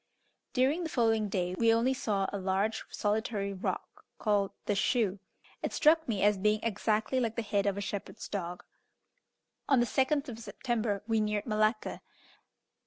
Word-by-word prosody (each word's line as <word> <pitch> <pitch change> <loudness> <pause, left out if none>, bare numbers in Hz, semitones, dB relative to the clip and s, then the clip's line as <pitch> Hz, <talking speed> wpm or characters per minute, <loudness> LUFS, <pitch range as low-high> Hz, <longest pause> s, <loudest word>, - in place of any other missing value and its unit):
During 270 +6 +2
the 330 - -3
following 225 -5 +2
day 180 -2 -1
we 225 +4 +3
only 230 +3 +3
saw 205 -6 0
a 200 - -2
large 195 +3 0
solitary 205 -1 -1
rock 190 - -4
called 205 -2 +1 0.2
"The 205 - +1
Shoe." 205 -1 +1 0.4
It - - -2
struck 320 +1 +4
me 210 -5 0
as 205 -1 +4
being 210 +2 +2
exactly 220 +3 0
like 230 -3 -1
the 230 - -1
head 205 -2 0
of 200 0 0
a - - -2
shepherd's 205 +2 -5
dog. 180 -3 -4 1.1
On 270 -3 +5
the 240 - +4
2nd 275 +4 +1
of 230 -3 -7
September 220 -1 -2
we 225 -1 +2
neared 210 -1 -1
Malacca. 215 0 0
215 Hz, 165 wpm, -31 LUFS, 200-235 Hz, 1.1 s, On